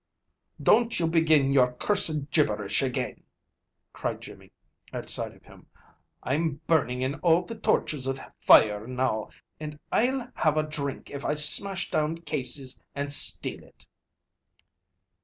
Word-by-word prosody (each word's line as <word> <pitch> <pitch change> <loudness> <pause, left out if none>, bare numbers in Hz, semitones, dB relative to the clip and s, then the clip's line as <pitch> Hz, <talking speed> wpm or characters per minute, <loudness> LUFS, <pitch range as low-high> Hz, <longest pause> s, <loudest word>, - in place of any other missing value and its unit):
"Don't 230 +1 +3
you 165 - +1
begin 160 -4 +3
your 125 -2 +3
cursed 155 -2 0
gibberish 105 -10 +1
again," 130 -1 -3 0.7
cried - - -4
Jimmy, - - -12 0.4
at - - -5
sight - - -3
of - - -23
him. - - -18 0.6
"I'm 145 +2 -1
burning 130 -6 +1
in 135 +3 -3
all 170 0 +3
the 205 - -8
tortures 150 - -1
of 135 0 -2 0.2
fire 105 +1 +5
now, 125 -4 -2 0.3
and 150 -1 -7
I'll 250 +1 0
have 155 -1 +1
a 155 - +2
drink 145 -3 -5
if 140 0 -7
I 150 - 0
smash 190 +6 +3
down 155 +1 0
Casey's 135 -4 -2
and 140 0 -3
steal - - +1
it." - - -19
150 Hz, 140 wpm, -26 LUFS, 130-165 Hz, 0.7 s, fire